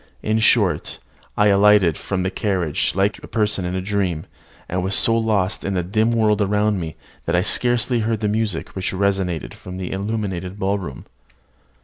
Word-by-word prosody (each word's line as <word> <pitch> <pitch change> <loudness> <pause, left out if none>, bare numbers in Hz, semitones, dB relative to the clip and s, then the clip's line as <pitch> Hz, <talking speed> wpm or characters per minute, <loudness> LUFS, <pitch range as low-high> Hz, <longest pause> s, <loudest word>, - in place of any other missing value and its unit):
In 110 +1 +1
short, 110 -4 +2 0.4
I 105 0 +4
alighted 100 -4 +5
from 95 +1 -3
the 95 - -1
carriage 95 -9 -1
like 100 +2 +1
a - - -8
person 105 -4 0
in 90 +1 -2
a 95 - -1
dream, 95 -5 -1 0.4
and 90 +1 -2
was 95 +2 0
so 115 - +3
lost 110 -4 +1
to - - -3
the 95 -2 -1
dim 110 +6 +1
world 110 -2 +2
around 105 0 +1
me, 80 -3 -5 0.3
that 85 - +1
I 90 - +3
scarcely 120 +2 +2
heard 110 0 -1
the 105 - +1
music 105 -4 -1
which 95 0 -4
resounded 95 -4 -1
from 90 0 -9
the 95 -1 -5
illuminated 95 -2 -3
ballroom. 95 -9 -3
100 Hz, 175 wpm, -21 LUFS, 90-105 Hz, 0.4 s, alighted